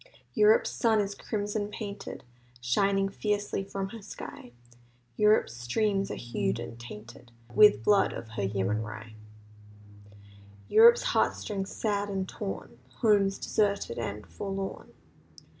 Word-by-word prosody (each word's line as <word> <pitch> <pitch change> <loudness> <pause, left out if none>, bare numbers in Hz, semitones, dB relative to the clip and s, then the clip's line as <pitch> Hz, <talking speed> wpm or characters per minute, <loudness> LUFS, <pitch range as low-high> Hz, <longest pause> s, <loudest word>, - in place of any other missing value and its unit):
Europe's 430 +3 +4
sun 225 -3 +2
is 200 -1 -1
crimson 205 0 -3
painted; 205 -1 -7 0.4
Shining 195 +11 +2
fiercely 205 0 -2
from 195 0 -4
her 225 +1 -9
sky; 160 - -9 0.6
Europe's 210 - +3
streams 195 - 0
are - - -3
hued 110 -4 -2
and 120 0 -7
tainted 120 +1 -11 0.2
With 210 - +6
blood 205 -1 +4
of 110 - -7
her 110 -2 -5
yeomanry. 105 +3 -3 1.5
Europe's 470 +2 +7
heart - - +2
strings, 195 -2 -4
sad 205 -2 -1
and 190 -1 -2
torn; 195 - -6 0.2
Homes 200 -3 +3
deserted 200 - 0
and 105 -2 -4
forlorn. 195 -1 -5
195 Hz, 120 wpm, -29 LUFS, -, 1.5 s, Europe's